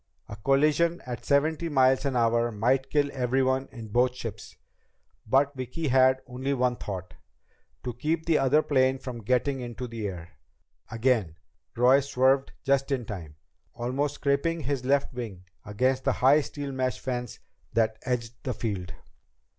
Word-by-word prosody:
A - - -7
collision 150 +9 +2
at 125 -2 -6
seventy 155 +3 +1
miles 130 -1 +3
an 135 -2 0
hour 120 0 +2
might 125 +5 +1
kill 145 -1 +1
everyone 130 +1 +1
in 115 -4 -9
both 125 +3 +2
ships. 115 -5 -7 0.7
But 135 +4 +3
Vicki 130 +5 -3
had 130 0 +4
only 130 +2 -2
one 125 -1 +1
thought 95 -2 -6 0.7
to 125 - -3
keep 155 +7 -2
the 165 -2 +3
other 140 +3 +3
plane 130 -2 +2
from 125 -3 -7
getting 130 +5 0
into 125 0 -6
the 115 -3 -4
air. 85 -3 -7 0.6
Again, 115 -8 +1 0.4
Roy 125 +3 +5
swerved 135 0 +2
just 140 -1 +1
in 130 -4 -1
time, 85 -9 -7 0.4
almost 130 +5 -1
scraping 145 +4 0
his 135 -2 -2
left 140 0 +1
wing 110 -7 -6 0.2
against 130 +5 0
the - - +2
high 140 +4 +5
steel 145 0 -6
mesh 130 -1 -1
fence 125 -3 -4 0.4
that 110 -1 +1
edged 125 -2 -2
the 130 -3 -3
field. 95 -5 -4
130 Hz, 155 wpm, -27 LUFS, 120-140 Hz, 0.7 s, Roy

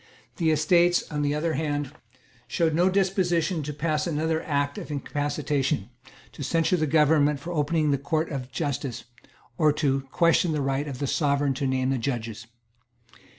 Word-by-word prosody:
The 165 -3 +1
Estates, 170 +3 +3
on 150 -1 -2
the 145 0 +1
other 160 +2 -1
hand, 145 -2 -2 0.6
showed 165 -2 +1
no 175 +4 +3
disposition 185 -3 +1
to 150 +1 -4
pass 150 +2 -1
another 160 0 0
Act 145 -1 -1
of - - -8
Incapacitation, 145 -4 -2 0.4
to - - -11
censure 165 +5 +1
the 155 -2 0
government 150 -1 +3
for 170 +5 -6
opening 155 0 +1
the 140 - +1
Courts 155 +4 -1
of 130 -3 -5
justice, 135 -3 -3 0.6
or 155 -1 +5
to 140 -3 +1
question 170 -1 +3
the 150 - -1
right 135 +2 -1
of 135 -3 -5
the 140 - -2
Sovereign 140 -1 +1
to 135 +1 -2
name 130 0 0
the 135 - 0
judges. 115 -3 -4
150 Hz, 165 wpm, -26 LUFS, 140-160 Hz, 0.6 s, or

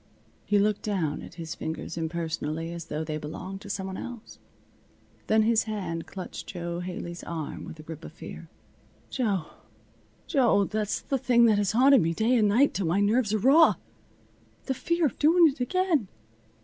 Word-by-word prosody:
He 205 - +3
looked 205 0 +2
down 185 -8 -1
at - - -11
his 165 -2 -6
fingers 160 +1 -5
impersonally, 165 -1 -3
as 170 -2 -7
though 150 0 -3
they 155 -1 -4
belonged 185 +6 -7
to 205 - -10
some 195 -1 -3
one 190 0 -5
else. 240 -3 -9 0.9
Then 220 0 +4
his 225 0 +3
hand 190 -7 -4
clutched 185 -2 -7
Jo 175 -1 -4
Haley's 175 -1 -6
arm 160 -3 -5
with - - -8
the 155 - -12
grip 160 0 -9
of - - -8
fear. 165 0 -10 0.6
"Jo! 205 - 0 0.8
Jo! 245 - +3
That's 210 0 -2
the 270 - -2
thing 235 -1 +4
that 215 -3 +4
has 205 0 0
haunted 265 +3 +6
me 165 +1 0
day 230 +6 +2
and 215 -3 +4
night, 245 +8 +4
till 190 -4 -1
my 175 +5 +2
nerves 210 +2 +2
are 215 - +2
raw. 280 +9 +6 0.9
The 265 - 0
fear 340 +5 0
of 285 - -2
doing 330 +3 +6
it 280 0 -7
again. 330 - +1
200 Hz, 180 wpm, -27 LUFS, 165-240 Hz, 0.9 s, haunted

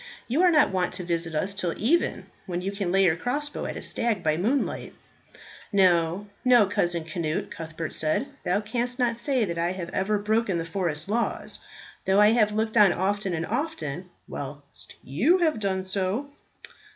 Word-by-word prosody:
You 270 +8 +1
are 365 - +6
not 305 - +4
wont 185 -2 0
to 180 0 -3
visit 170 -2 -2
us 190 +6 0
till 180 -4 -1
even, 315 +11 +1 0.2
when 175 -1 -2
you 190 +2 -3
can 200 -3 -2
lay 195 +1 +4
your 160 -3 +4
crossbow 290 - -3
at - - -5
a - - -5
stag 225 -6 0
by 155 -1 +2
moonlight." 230 - -1 0.8
"No, 180 -1 +3 0.2
no, 245 -4 +6
Cousin 175 -5 0
Cnut," 155 -1 -3
Cuthbert 160 0 -6
said, 155 - +2 0.2
"thou 205 - +1
canst 245 +3 -2
not 245 -3 +1
say 245 0 0
that 170 -3 -4
I 170 +2 0
have 180 -2 -6
ever 210 +4 0
broken 210 -2 0
the 165 - -3
forest 165 -3 -2
laws, 230 +3 -1 0.5
though 190 +1 +3
I 210 +1 +7
have 220 -2 +3
looked 220 +1 -1
on 205 -3 +7
often 195 +1 -1
and 160 0 -2
often, 190 - -3 0.2
whilst 140 0 -8
you 245 - +3
have 320 -9 +1
done 190 -2 -1
so." 195 +8 -1
195 Hz, 180 wpm, -26 LUFS, 170-230 Hz, 0.8 s, I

